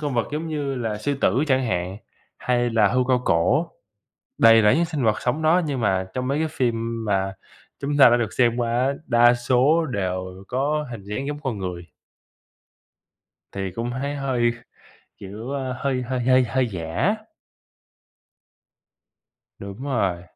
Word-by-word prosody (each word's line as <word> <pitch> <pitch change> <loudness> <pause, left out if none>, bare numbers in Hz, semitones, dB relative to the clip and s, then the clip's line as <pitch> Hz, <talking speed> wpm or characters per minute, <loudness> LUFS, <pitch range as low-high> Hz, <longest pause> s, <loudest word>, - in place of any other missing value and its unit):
con 145 -4 -3
vật 115 -3 0
giống 160 +2 -3
như 145 -3 -2
là 115 -4 -3
sư 145 +5 -1
tử 130 - +2
chẳng 130 -2 +2
hạn, 90 0 -2 0.4
hay 120 -1 0
là 110 -3 +3
hươu 125 +4 +1
cao 125 -1 +1
cổ, 115 - +2 0.7
đầy 115 -1 +7
rẫy 105 +5 +5
những 170 - +2
sinh 155 -7 -3
vật 110 -1 +1
sống 145 +6 -1
đó 165 +3 +4
nhưng 135 -4 -2
mà 95 -3 +1
trong 125 0 -2
mấy 140 - 0
cái 160 0 0
phim 115 -4 -2
mà 95 -2 0 0.5
chúng 145 +1 -2
ta 135 - +9
đã 120 - +4
được 115 -4 -2
xem 120 -2 +3
qua 120 -1 -1
á, 125 +2 +2 0.2
đa 120 -1 +5
số 130 +7 +2
đều 95 -6 -2 0.2
có 145 +3 -1
hình 115 -4 -7
dáng 105 +7 -4
giống 145 0 -4
con 130 -8 -4
người. 90 -2 -6 1.6
Thì 95 -1 -4
cũng 115 +4 -3
thấy 140 +3 -3
hơi, 125 -4 +1 0.7
kiểu, 110 +7 -7
a, 130 -2 -3
hơi 130 -2 -1
hơi 125 +1 -3
hơi 130 +1 +4
hơi 125 +1 0
giả 80 -5 -6
á. 210 +4 +2 2.4
Đúng 100 +4 -8
rồi. 95 -11 -1
125 Hz, 170 wpm, -23 LUFS, 105-140 Hz, 2.4 s, ta